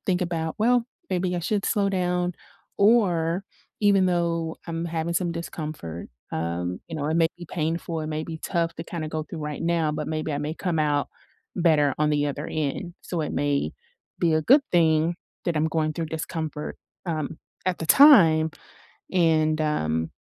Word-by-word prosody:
think 185 -1 +1
about, 165 -2 -2
"Well, 240 +2 +3 0.3
maybe 180 0 0
I - - 0
should 200 +3 -1
slow 205 -3 +2
down," 180 -2 0 0.4
or 190 -5 +3 0.4
even 200 -3 +4
though 170 -2 0
I'm 165 0 -3
having 165 0 -2
some 175 0 +1
discomfort, 155 - -6 0.2
um, 85 +2 -2
you 165 - -5
know, 145 -1 -2
it 155 - 0
may 165 -1 +4
be 175 - -8
painful. 165 0 -2
It 155 - -4
may 155 0 -2
be 160 0 -6
tough 170 0 -1
to - - -4
kinda 165 -2 -4
go 155 0 -3
through 160 +2 -8
right 150 0 -4
now, 165 -2 +1
but 150 -1 -3
maybe 155 0 -2
I 145 - -1
may 150 +2 -3
come 170 -2 -2
out 145 -1 +1 0.5
better 155 -5 +3
on 150 0 +2
the 145 -1 +2
other 145 +1 -3
end, 155 +4 -3
so 170 -3 -3
it 150 - -2
may 140 - 0 0.5
be 170 -2 +2
a 155 - +3
good 275 - +6
thing 165 -1 +3 0.3
that 170 -3 0
I'm 155 - +2
going 155 -1 0
through 165 +1 -3
discomfort, 155 -1 -4 0.3
um, 155 -2 -3 0.3
at 185 -1 0
the 165 - -4
time 165 - +7 0.6
and, 160 -3 +3
um 80 - 0
160 Hz, 180 wpm, -25 LUFS, 155-175 Hz, 0.6 s, time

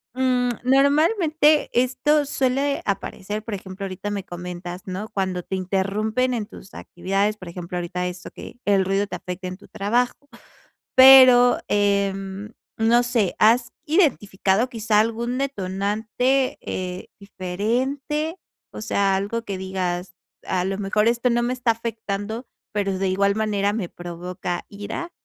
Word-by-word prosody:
Mm, 250 -1 +2
¿normalmente 300 - +3
esto 260 +4 +2
suele 275 +1 0
aparecer? 205 +1 -3
Por 225 - -6
ejemplo, 190 +1 -8
ahorita 190 +2 -5
me 200 -2 -3
comentas, 175 +1 -7
¿no? 190 +4 -5
Cuando 185 -2 -2
te 190 - -4
interrumpen 205 +7 0
en 220 -3 -2
tus 195 - -14
actividades, 195 +4 -1
por 185 - -11
ejemplo, 180 0 -6
ahorita 180 +1 -3
eso, 180 +1 -8
que - - -11
el 195 -2 +3
ruido 195 +1 +1
te 200 - -6
afecte 180 +1 -6
en 185 0 -6
tu 205 - -17
trabajo, 245 +7 -1 0.7
pero 255 -2 +9
em, 200 0 0 0.3
no 235 +2 +4
sé, 235 -6 0
¿has 235 +2 +4
identificado 230 - +2
quizá 220 -2 +1
algún 235 +3 0
detonante, 220 +2 0
eh, 180 0 -5
diferente? 260 - -2 0.4
O - - -7
sea, 200 -2 +1
algo 210 +4 -2
que 200 -4 -4
digas: 180 -1 -3 0.3
"A 180 -1 -1
lo 195 0 -2
mejor 210 +2 +1
esto 235 +1 +2
no 240 0 +2
me 250 +1 0
está 245 -2 +1
afectando, 225 0 -4 0.3
pero, 195 -2 -1
de 195 - +1
igual 200 +1 +2
manera 205 -2 0
me 200 -6 -3
provoca 175 0 -5
ira". 210 +12 -6
205 Hz, 145 wpm, -23 LUFS, 190-245 Hz, 0.7 s, pero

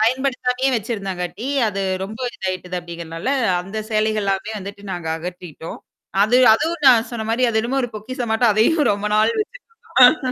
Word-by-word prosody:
பயன்படுத்தாமயே 255 +2 +1
வச்சிருந்தாங்காட்டி, 200 -2 -4 0.2
அது 195 -1 -3 0.2
ரொம்ப 215 +3 -8 0.2
இதாயிட்டது 185 -1 -4
அப்படிங்கறதால, 170 +3 -6 0.3
அந்தச் 215 +4 -6
சேலைகள்லாமே 215 -1 0
வந்துட்டு 200 +1 -9
நாங்க 175 -3 -5
அகற்றிட்டோம். 170 -1 -8 0.4
அது 220 +4 +3 0.2
அதுவும் 320 +5 -2
நான் 235 -2 +5
சொன்ன 235 -2 -4
மாதிரி 240 +3 +1
அது 225 -1 +1
என்னமோ 245 +4 -1
ஒரு 245 - -2
பொக்கிஷம் 235 +2 -5
மாட்டம் 225 +1 +3
அதையும் 290 +9 +3
ரொம்ப 205 +1 -3
நாள் 215 +1 +4 0.5
வச்சிக்கிட்ருந்தோம். 255 0 +4
215 Hz, 145 wpm, -20 LUFS, 190-245 Hz, 0.5 s, நான்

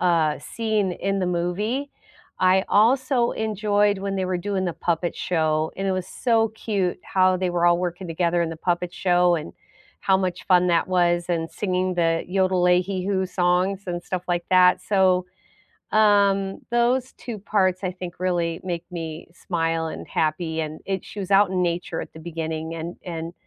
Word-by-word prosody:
uh, 165 -4 +2
scene 215 +1 -1
in 195 +2 -2
the 185 - 0
movie. 205 +11 -1 0.5
I 185 +1 +4
also 245 +3 +3
enjoyed 210 -2 +1
when 195 0 -3
they 190 - 0
were 185 -1 -1
doing 190 +1 -2
the 175 - -1
puppet 170 +1 -1
show, 155 -2 0
and 195 - -2
it 190 - +1
was 185 -1 -2
so 225 +2 +1
cute 205 -4 -2
how 185 -1 +3
they 185 0 -1
were 175 0 +1
all 175 0 +4
working 180 +1 -3
together 170 +1 0
in 165 - -1
the 165 - -6
puppet 175 +1 -1
show, 180 -1 +3
and 150 - -4 0.5
how 190 - +4
much 185 -2 -3
fun 180 -1 +4
that 170 0 +2
was, 175 -1 +2
and 165 -2 -1
singing 185 -2 -1
the, 165 -1 +1
yodel-ay-hee-hoo 185 +1 +1
songs, 180 +2 +1
and 175 -1 -3
stuff 185 0 -4
like 175 -1 -1
that, 180 -1 +5
so, 185 -2 +2 0.7
um, 200 -2 +3
those 245 +2 +1
2 235 -3 -7
parts, 190 -2 0
I 185 - -1
think, 180 -1 -8
really 175 -2 -1
make 175 -2 -4
me 160 -2 -6
smile, 165 -2 -2
and - - -7
happy, 160 +1 -1
and 155 0 -5
it 190 -2 -2
she 210 - -9
was 190 -2 -5
out 195 -1 +5
in 185 -1 0
nature 170 -1 -2
at - - -9
the 160 - -11
beginning, 160 -1 -4
and 165 +2 -5
and, 165 -1 -5
180 Hz, 180 wpm, -23 LUFS, 170-195 Hz, 0.7 s, that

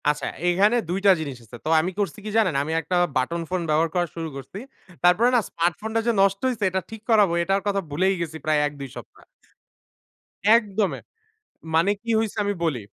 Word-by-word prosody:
আচ্ছা 150 - -1 0.2
এইখানে 200 +6 +3
২ 185 +2 -1
টা 200 - +8
জিনিস 140 -5 -5
আছে। 120 +2 -11
তো - - -1
আমি 180 +4 -2
করছি 205 +1 -2
কি - - -3
জানেন? 185 -9 +2
আমি 155 - -4
একটা 165 +4 -3 0.2
বাটন 170 +7 0
ফোন 185 -1 -1
ব্যবহার 160 +2 +2
করা 175 -1 +1
শুরু 165 -1 -4
করছি। 135 +7 -9 0.5
তারপরে 180 +7 +5
না - - +6
স্মার্ট 170 +1 0
ফোনটা 220 +1 -1
যে - - +4
নষ্ট 195 0 +3
হইছে, 230 -4 -3
এটা 190 0 -1
ঠিক 220 -1 -9
করাবো 210 -6 +4
এটার 195 +3 +1
কথা 200 -1 +1
ভুলেই 185 +7 +1
গেছি 160 -1 -4
প্রায় 155 -1 +2
১-২ 140 -2 -8
সপ্তাহ। - - -12 1.3
একদমে! 210 -3 -1 0.8
মানে 165 +5 +4
কি 230 - -5
হইছে, 220 -1 -2
আমি 205 - 0
বলি 155 -6 0
180 Hz, 195 wpm, -24 LUFS, 160-205 Hz, 1.3 s, টা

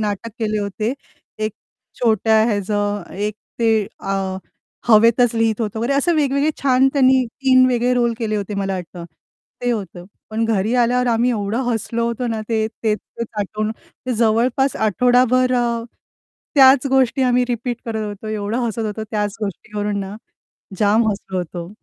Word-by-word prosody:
नाटक 210 +2 -3
केले 215 -1 -1
होते. 210 +4 -2
ते 245 -5 -10
एक 215 - -2 0.5
छोट्या 220 -2 +3
ह्याचं 205 -2 -1
एक 205 +2 -2 0.3
ते 220 -3 +3
आं, 195 -1 -2 0.5
हवेतच 230 +2 +5
लिहित 225 0 +1
होतं 220 0 -2
वगैरे, 240 +5 0
असं 335 +5 +2
वेगवेगळे 285 0 +2
छान 265 0 +4
त्यांनी 260 -2 +4
3 255 +2 +3
वेगळे 245 0 +1
रोल 240 -1 +2
केले 215 -2 -1
होते 205 0 -4
मला 195 -1 -2
वाटतं, 175 -1 -7 0.6
ते 245 - +1
होतं. 190 -6 -4 0.3
पण 225 +1 0
घरी 225 +1 0
आल्यावर 250 +1 +2
आम्ही 235 +2 +2
एवढं 215 +3 -1
हसलो 230 +1 -1
होतो 235 +1 -2
ना, 225 -2 -2
ते 220 -1 +1 0.2
तेच-तेच 220 +1 -2
आठवून, 215 +2 -2
ते 250 +2 -8
जवळपास 235 +4 +2
आठवडाभर 250 +4 +3
अ, 235 -1 0 0.7
त्याच 270 -1 +6
गोष्टी 265 -1 +2
आम्ही 250 -1 +3
रिपीट 240 0 -2
करत 220 -2 -3
होतो, 205 +1 -7
एवढं 215 +2 -2
हसत 225 0 -2
होतो 215 +1 -4
त्याच 210 -2 -1
गोष्टीवरून 205 +1 -3
ना, 195 +1 -6 0.6
जाम 215 +2 +3
हसलो 190 -2 -4
होतो. 175 0 -5
225 Hz, 155 wpm, -20 LUFS, 210-245 Hz, 0.7 s, त्याच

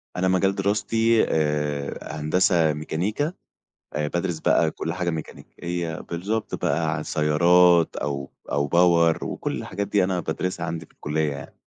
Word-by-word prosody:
أنا 90 +1 +1
مجال 95 +1 +2
دراستي 110 +3 +2
آآ، 75 -2 -1 0.2
هندسة 85 +1 +3
ميكانيكا 100 - -2 0.6
آآ، 75 +1 -1
بادرس 85 0 -2
بقى - - +3
كل 80 - -4
حاجة 90 0 -1
ميكانيكية. 85 +1 -5
بالضبط 100 +6 -3
بقى 80 -1 0
عن 75 - -4
سيارات 85 +2 +4
أو 70 -2 -3 0.2
أو 70 0 +1
power 85 -1 +4
وكل - - -3
الحاجات 100 +1 -4
دي 100 -3 +3
أنا 90 -1 0
بادرسها 90 +3 -3
عندي 80 0 -5
في - - -28
الكلية 75 0 -1
يعني. 70 - -9
85 Hz, 145 wpm, -24 LUFS, 75-95 Hz, 0.6 s, سيارات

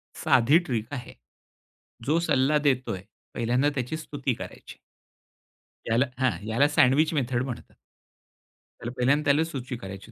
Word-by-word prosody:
साधी 135 +7 +4
ट्रिक 120 -11 -3
आहे. 125 -4 -6 0.9
जो 155 +5 +2
सल्ला 150 -3 +2
देतोय, 130 -9 0 0.3
पहिल्यांदा 125 +5 +1
त्याची 130 +4 -2
स्तुती 145 -4 -3
करायची. - - -10 1.1
याला 115 +4 +2
हां, 130 -1 +2 0.2
याला 120 +6 +3
सँडविच 150 +1 +3
मेथड 130 -4 0
म्हणतात. 130 -3 -7 1.1
त्याला 120 - -5
पहिल्यांदा 140 +4 +2
त्यालाच 150 +3 +3
सुची 130 -3 -5
करायची. 95 -4 -9
130 Hz, 125 wpm, -26 LUFS, 120-145 Hz, 1.1 s, साधी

